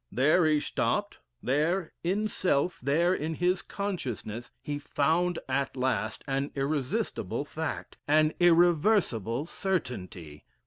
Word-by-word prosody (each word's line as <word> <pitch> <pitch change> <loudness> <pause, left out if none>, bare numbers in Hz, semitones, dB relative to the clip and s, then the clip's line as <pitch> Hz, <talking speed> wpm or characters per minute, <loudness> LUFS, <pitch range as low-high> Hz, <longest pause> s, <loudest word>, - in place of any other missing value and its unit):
There 155 +6 +4
he 155 -1 +3
stopped: - - -1 0.2
there 155 +7 0
in 200 +5 +1
self, 180 -4 0
there 160 +7 +2
in 160 -1 -2
his 180 +3 +1
consciousness, 125 - -4
he 145 +1 -4
found 165 +5 +1
at 140 -1 -1
last 115 -4 -1
an 135 +1 -1
irresistible 140 -1 -1
fact, - - -5
an 155 +1 +4
irreversible 170 - +3
certainty. 95 - -4
150 Hz, 115 wpm, -29 LUFS, 130-175 Hz, 0.2 s, There